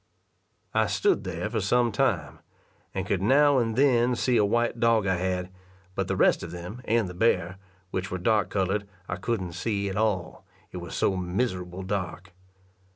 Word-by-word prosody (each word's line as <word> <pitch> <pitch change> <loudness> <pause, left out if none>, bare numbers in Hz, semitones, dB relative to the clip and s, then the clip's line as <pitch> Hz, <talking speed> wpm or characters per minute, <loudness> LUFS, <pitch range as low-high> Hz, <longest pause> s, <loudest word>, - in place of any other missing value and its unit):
I - - +3
stood - - +1
there - - -3
for 110 0 -2
some 120 +4 +2
time, 100 - 0 0.5
and 95 -1 -3
could 100 -2 0
now 140 +5 +5
and 115 -2 0
then 125 -2 +3
see 125 +1 +1
a 105 - +5
white 120 +3 +1
dog 115 -2 +3
I 95 -2 +1
had, 90 0 -2 0.4
but - - -2
the - - -1
rest - - +3
of - - -6
them, 90 +8 -7
and 115 -2 +2
the 90 - -7
bear, 90 -2 +1 0.3
which 95 0 -2
were 95 - -3
dark 105 +3 +2
coloured, 100 +1 -1 0.2
I 90 - -3
couldn't 95 -3 -2
see 100 +2 -2
at 95 - -4
all, 100 -6 -1 0.3
it - - -7
was 85 -1 -7
so 95 - +1
miserable 90 -1 -2
dark. 95 0 -4
100 Hz, 180 wpm, -27 LUFS, 90-115 Hz, 0.5 s, now